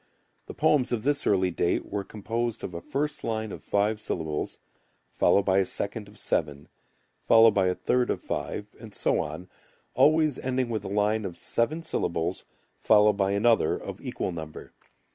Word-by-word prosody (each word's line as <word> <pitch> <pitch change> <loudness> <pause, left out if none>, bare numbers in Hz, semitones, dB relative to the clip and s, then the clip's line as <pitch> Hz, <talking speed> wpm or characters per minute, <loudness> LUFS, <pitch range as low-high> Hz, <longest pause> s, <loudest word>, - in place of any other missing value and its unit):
The - - -8
poems 150 -5 +2
of 115 -3 -1
this 145 +1 0
early 95 -2 +2
date 85 0 0
were 100 0 -4
composed 115 +3 -3
of 90 - -5
a 85 - -6
first 145 +9 -2
line 110 -2 -2
of - - -9
five 105 +1 0
syllables, 80 -7 -3 0.5
followed 100 - +3
by 95 0 +3
a - - +4
second 100 +3 -2
of 105 +1 -16
seven, 75 -2 -2 0.6
followed 115 0 +7
by 95 -3 +2
a 90 - +1
third 125 -1 0
of - - 0
five, 105 - -4
and 110 -3 -11
so - - +1
on, 80 +5 -5 0.5
always 155 -2 +3
ending 130 -1 -1
with 110 -3 -2
a - - -5
line 105 +2 +1
of 90 -4 -6
seven 155 +8 -1
syllables 85 - -2 0.3
followed 105 -1 +5
by 100 0 0
another 110 -4 +3
of - - -8
equal - - -3
number. 80 -2 -8
105 Hz, 175 wpm, -27 LUFS, 95-120 Hz, 0.6 s, followed